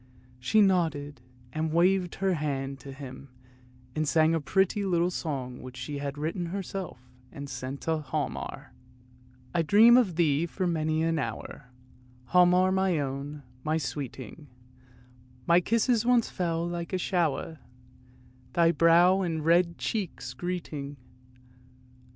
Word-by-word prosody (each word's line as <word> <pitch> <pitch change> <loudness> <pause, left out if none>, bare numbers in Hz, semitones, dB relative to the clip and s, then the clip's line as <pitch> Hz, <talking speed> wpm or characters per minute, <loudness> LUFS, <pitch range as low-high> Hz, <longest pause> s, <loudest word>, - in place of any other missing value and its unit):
She 170 +13 +3
nodded 160 -8 0 0.3
and 155 0 -1
waved 180 +2 +2
her 190 -1 0
hand 140 -3 -3
to 140 - -10
him, 135 0 -10 0.7
and 155 -1 0
sang 155 +3 +3
a 165 - 0
pretty 195 +6 +1
little 175 -2 +1
song 135 -8 -4
which 130 0 -10
she 140 +3 -5
had 140 0 -4
written 165 +4 -3
herself 190 -2 -5 0.3
and 140 0 -7
sent 130 +1 -6
to 160 -1 0
Hialmar: 140 - -4 0.4
" 125 0 -27
I 170 - +2
dream 215 +9 +7
of 205 -9 +2
thee 160 -1 +2
for 185 +2 -3
many 160 -2 0
an 165 -1 +1
hour, 135 -2 -6 0.6
Hialmar, 180 +1 +5
my 190 -2 +1
own, 140 +1 -4 0.2
my 155 +1 0
sweeting; 145 -1 -6 1.0
My 170 +1 +5
kisses 230 +3 +2
once 240 -1 +2
fell 170 -1 -1
like 175 +1 -5
a - - +2
shower, 165 -3 -1 0.9
Thy 170 -1 +4
brow 170 +3 +5
and 160 -4 -2
red 170 +1 +3
cheeks 205 -7 -4
greeting. 155 -6 -5
165 Hz, 135 wpm, -28 LUFS, 145-180 Hz, 1.0 s, dream